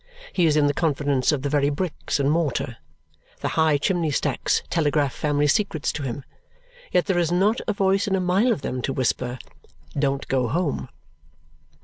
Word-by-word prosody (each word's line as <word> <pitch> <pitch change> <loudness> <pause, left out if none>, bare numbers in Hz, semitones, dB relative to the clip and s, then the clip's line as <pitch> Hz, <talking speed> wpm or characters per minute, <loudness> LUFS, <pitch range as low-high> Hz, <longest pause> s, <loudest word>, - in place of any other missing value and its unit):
He 175 -3 +3
is 155 -1 +3
in 150 - +4
the 145 - +2
confidence 145 -4 +1
of 140 -3 -2
the 140 - -1
very 145 -1 +2
bricks 155 0 -2
and 140 +1 +2
mortar. 150 -7 -1 0.6
The - - -1
high 160 -2 +3
chimney 170 +1 0
stacks 145 - 0
telegraph 145 -4 +1
family 145 -1 0
secrets 160 0 +1
to 155 - -5
him. 135 0 -4 0.7
Yet 180 - +2
there 190 -3 +1
is 170 -1 +1
not 200 +7 +2
a 210 - +1
voice 195 +1 +1
in 195 - +1
a - - +1
mile 185 +7 +2
of 145 - -2
them 125 - -3
to 135 - -2
whisper, 125 -1 -1 0.6
"Don't 140 -1 0
go 130 -2 +1
home!" 165 +4 -1
150 Hz, 180 wpm, -24 LUFS, 140-180 Hz, 0.7 s, in